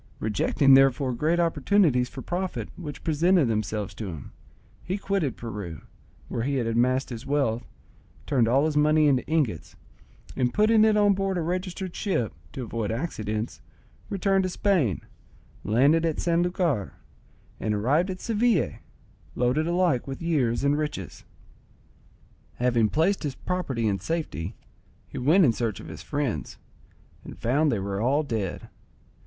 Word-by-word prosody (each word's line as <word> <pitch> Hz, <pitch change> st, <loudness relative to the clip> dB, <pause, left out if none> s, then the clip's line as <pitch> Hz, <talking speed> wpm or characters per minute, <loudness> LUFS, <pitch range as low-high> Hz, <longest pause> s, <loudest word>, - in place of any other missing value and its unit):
Rejecting 135 Hz, +6 st, +3 dB
therefore 135 Hz, -1 st, +4 dB
great 155 Hz, +8 st, +1 dB
opportunities 160 Hz, -5 st, +2 dB
for 130 Hz, -, -8 dB
profit 185 Hz, +1 st, -3 dB
which 150 Hz, -6 st, -8 dB
presented 165 Hz, +1 st, +3 dB
themselves 105 Hz, -2 st, -2 dB
to 110 Hz, -, -6 dB
him, 80 Hz, -7 st, -8 dB, 0.5 s
he 185 Hz, +2 st, -2 dB
quitted 195 Hz, -9 st, -1 dB
Peru, 100 Hz, -9 st, -6 dB, 0.5 s
where -, -, -3 dB
he 140 Hz, +4 st, -1 dB
had 125 Hz, -3 st, 0 dB
amassed 125 Hz, +4 st, +1 dB
his 115 Hz, 0 st, -6 dB
wealth, 135 Hz, -5 st, 0 dB, 0.6 s
turned 125 Hz, -6 st, +2 dB
all 135 Hz, +5 st, +3 dB
his 155 Hz, -1 st, -1 dB
money 150 Hz, +1 st, +4 dB
into 135 Hz, -4 st, +3 dB
ingots, 145 Hz, -, -1 dB, 0.6 s
and 125 Hz, -1 st, 0 dB
putting 215 Hz, +1 st, +5 dB
it 215 Hz, -1 st, +3 dB
on 205 Hz, -1 st, +5 dB
board 195 Hz, -1 st, -1 dB
a -, -, 0 dB
registered 185 Hz, +1 st, -3 dB
ship, 120 Hz, -, -1 dB, 0.2 s
to 130 Hz, -, -5 dB
avoid 115 Hz, -2 st, -3 dB
accidents, 110 Hz, -4 st, -3 dB, 0.5 s
returned 195 Hz, 0 st, +1 dB
to 185 Hz, -, -1 dB
Spain, 175 Hz, -, +1 dB, 0.6 s
landed 140 Hz, +10 st, +3 dB
at 165 Hz, -2 st, -1 dB
San 170 Hz, 0 st, +2 dB
Lucar, 175 Hz, -, 0 dB, 0.7 s
and 105 Hz, -1 st, -1 dB
arrived 145 Hz, -, +1 dB
at 185 Hz, 0 st, -4 dB
Seville, 220 Hz, -, +1 dB, 0.6 s
loaded 125 Hz, +6 st, +1 dB
alike 170 Hz, -8 st, +1 dB
with 135 Hz, -1 st, -5 dB
years 135 Hz, -8 st, 0 dB
and 145 Hz, +1 st, +2 dB
riches. 150 Hz, -, -5 dB, 1.3 s
Having 120 Hz, -3 st, +2 dB
placed 175 Hz, -, +1 dB
his 145 Hz, -4 st, -3 dB
property 135 Hz, -11 st, -2 dB
in 100 Hz, -2 st, 0 dB
safety, 155 Hz, -, -3 dB, 0.5 s
he -, -, -7 dB
went 160 Hz, +8 st, +5 dB
in 120 Hz, -, +3 dB
search 110 Hz, -5 st, -2 dB
of -, -, -10 dB
his -, -, -8 dB
friends, 135 Hz, -, -3 dB, 0.7 s
and -, -, -10 dB
found 145 Hz, +6 st, +2 dB
they 115 Hz, -, 0 dB
were 100 Hz, +1 st, -3 dB
all 140 Hz, +6 st, +2 dB
dead. 110 Hz, -10 st, -3 dB
140 Hz, 150 wpm, -26 LUFS, 115-175 Hz, 1.3 s, putting